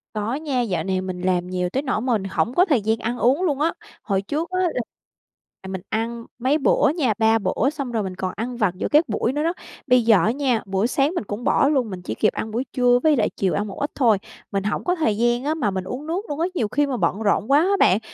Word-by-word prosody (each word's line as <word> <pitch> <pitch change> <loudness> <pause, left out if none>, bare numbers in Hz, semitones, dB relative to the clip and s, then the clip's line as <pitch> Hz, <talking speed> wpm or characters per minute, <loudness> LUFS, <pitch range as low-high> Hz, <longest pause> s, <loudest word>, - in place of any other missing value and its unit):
Có 215 +3 -2
nha, 280 -4 -1
dạo 180 -8 -1
này 190 0 -1
mình 185 -1 -5
làm 180 -1 0
nhiều 180 -1 -2
tới 270 +9 -2
nỗi 250 -5 -1
mà 250 -1 0
mình 210 -4 0
hổng 235 +5 0
có 360 - +5
thời 275 - +2
gian 220 +2 +1
ăn 240 +2 -3
uống 270 +11 +2
luôn 290 -5 0
á. 330 - +2 0.3
Hồi 195 -2 0
trước 305 - -3
á 365 - -1
là 330 -9 0 0.8
à, 190 - -10
mình 190 -1 -5
ăn 230 +1 -3
mấy 265 +5 +2
bữa 280 - +3
nha, 260 -9 +2
3 225 0 +3
bữa, 215 +6 0
xong 280 -5 -5
rồi 225 -3 -1
mình 185 -1 -5
còn 185 -1 -3
ăn 240 +3 -4
vặt 200 -6 +1
giữa - - -2
các 300 -3 +4
buổi 230 +4 0
nữa 295 +1 -1
đó. 335 +2 +1 0.3
Bây 250 -2 +4
giờ 220 -3 +6
á 220 - +3
nha, 255 -4 0
buổi 195 +3 0
sáng 280 +5 +1
mình - - -1
cũng 205 +4 -6
bỏ 280 - +3
luôn, 260 -7 +1
mình 185 -2 -6
chỉ - - -5
kịp 215 - +2
ăn 220 - -4
buổi 235 +4 -1
trưa 245 -1 +4
với 310 -2 +5
lại 215 - +2
chiều 190 -2 +1
ăn 210 +1 -1
một 195 - -8
ít 290 - -1
thôi. 230 -7 +4 0.3
Mình 195 -1 -1
hổng 205 - -2
có 360 0 +1
thời 220 -11 0
gian 240 +2 +1
á, 300 - 0
mà 220 -10 0
mình 190 -1 -3
uống 255 +10 -6
nước 345 +5 -1
luôn 290 +1 -4
á. 340 - +1
Nhiều 225 -9 0
khi 290 +7 +1
mà 260 - -2
bận 195 +2 0
rộn 215 +4 +1
quá 285 - +6
á 355 - +2
bạn, 190 +4 +5
235 Hz, 280 wpm, -22 LUFS, 200-280 Hz, 0.8 s, giờ